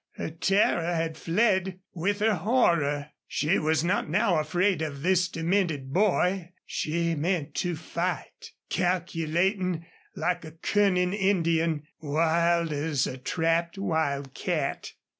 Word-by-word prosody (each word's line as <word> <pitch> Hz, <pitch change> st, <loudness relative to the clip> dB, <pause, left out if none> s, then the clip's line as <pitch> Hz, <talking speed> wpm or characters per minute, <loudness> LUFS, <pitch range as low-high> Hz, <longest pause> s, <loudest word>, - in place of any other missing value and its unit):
Her -, -, -5 dB
terror 175 Hz, 0 st, +2 dB
had 165 Hz, -1 st, -1 dB
fled 190 Hz, +1 st, +1 dB
with 200 Hz, +4 st, -1 dB
her 220 Hz, 0 st, +4 dB
horror. 165 Hz, -, +1 dB, 0.2 s
She 155 Hz, +5 st, +1 dB
was 155 Hz, 0 st, +1 dB
not 180 Hz, -2 st, 0 dB
now 180 Hz, -1 st, +2 dB
afraid 175 Hz, +4 st, +1 dB
of 145 Hz, -3 st, -4 dB
this 180 Hz, 0 st, +3 dB
demented 165 Hz, -6 st, -1 dB
boy. 185 Hz, -2 st, +1 dB
She 170 Hz, +2 st, -1 dB
meant 160 Hz, 0 st, -1 dB
to 175 Hz, -2 st, 0 dB
fight, 170 Hz, +3 st, -4 dB, 0.2 s
calculating 180 Hz, 0 st, 0 dB, 0.3 s
like 175 Hz, +2 st, -1 dB
a 155 Hz, -1 st, -9 dB
cunning 180 Hz, +1 st, +1 dB
Indian, 170 Hz, -6 st, +1 dB, 0.2 s
wild 165 Hz, +2 st, +1 dB
as 145 Hz, -2 st, 0 dB
a 130 Hz, -, -5 dB
trapped 165 Hz, +5 st, 0 dB
wildcat. 150 Hz, -3 st, -2 dB
170 Hz, 120 wpm, -27 LUFS, 160-185 Hz, 0.3 s, her